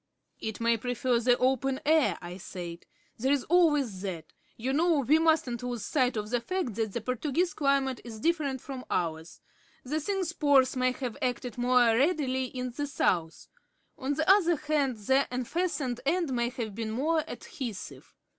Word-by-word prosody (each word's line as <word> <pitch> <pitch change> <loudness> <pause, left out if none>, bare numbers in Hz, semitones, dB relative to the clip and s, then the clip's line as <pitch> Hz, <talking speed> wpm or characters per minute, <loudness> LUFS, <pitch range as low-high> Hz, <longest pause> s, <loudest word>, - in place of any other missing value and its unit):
"It 220 -1 -5
may 230 0 +2
prefer 245 +1 0
the 245 +1 +3
open 265 +1 +1
air," 300 - +3
I 175 +1 -7
said. 175 -2 -8 0.3
"There's 265 +3 +2
always 295 - +2
that. 175 -6 -6 0.2
You 255 +4 -2
know 320 0 +3
we 295 +5 +4
mustn't 315 -7 +2
lose 245 -4 -4
sight 255 -3 +1
of 210 +1 -4
the 245 - +2
fact 370 - -2
that 220 -1 -2
the 235 - -2
Portuguese 280 +9 -1
climate 275 -3 +1
is 225 -2 -8
different 290 -4 0
from 265 -2 -7
ours. 160 -1 -3 0.4
The 300 +5 -2
thing's 370 +1 -2
pores 280 -6 +4
may 255 0 +2
have 250 -3 -5
acted 245 -2 -2
more 250 0 +4
readily 265 -2 +1
in 250 0 -5
the 290 +4 -3
South. 170 - 0 0.5
On 280 +2 -2
the 315 +1 -1
other 370 -3 +5
hand, 290 -4 0
the 265 +6 +2
unfastened 255 0 -2
end 320 0 0
may 240 -1 +1
have 235 -5 -5
been 225 +1 -4
more 305 +8 +1
adhesive. 235 - -7
255 Hz, 165 wpm, -29 LUFS, 230-295 Hz, 0.5 s, other